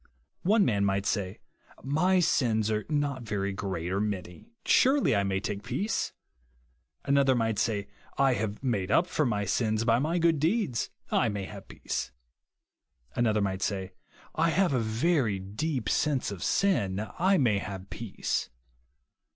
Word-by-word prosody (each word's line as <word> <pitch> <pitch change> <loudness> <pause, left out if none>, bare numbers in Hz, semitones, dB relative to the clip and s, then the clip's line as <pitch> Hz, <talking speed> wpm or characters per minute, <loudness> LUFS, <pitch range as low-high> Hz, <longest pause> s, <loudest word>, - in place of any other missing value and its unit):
One 205 +2 +4
man 100 -4 +1
miglit 100 0 +1
say. 100 -1 -2 0.4
My 180 +7 +2
sins 110 -9 +2
are 105 0 -1
not 145 -3 0
very 100 -3 -2
great 95 -4 -3
or 100 - 0
many; 100 - -4 0.2
surely 265 - +4
I 100 - +3
may 95 -1 0
take 100 0 -4
peace. 135 - -2 0.9
Another 140 -1 +4
might 115 -3 0
say, 100 -2 0 0.3
I 135 -1 +4
have 105 +1 -3
made 105 -8 0
up 170 - +4
for 155 -4 0
my 105 -3 0
si 100 +5 +1
as 110 +1 0
by 115 0 +4
my 160 +6 0
good 165 -3 +3
deeds, 165 - 0 0.2
I 115 - +3
may 100 -2 -3
have - - -10
peace. - - -4 1.0
Another 110 -3 +2
might 95 -1 -1
say, 95 -1 -2 0.4
I 165 +1 +2
have 180 -1 +2
a 130 - +2
very 115 - +1
deep 110 +6 -3
sense 140 -1 +1
of 95 -4 -7
sin, 105 - +1
I 190 +2 +4
may 115 - +3
have 95 -1 -7
peace. 115 -4 -3
115 Hz, 160 wpm, -28 LUFS, 100-145 Hz, 1.0 s, One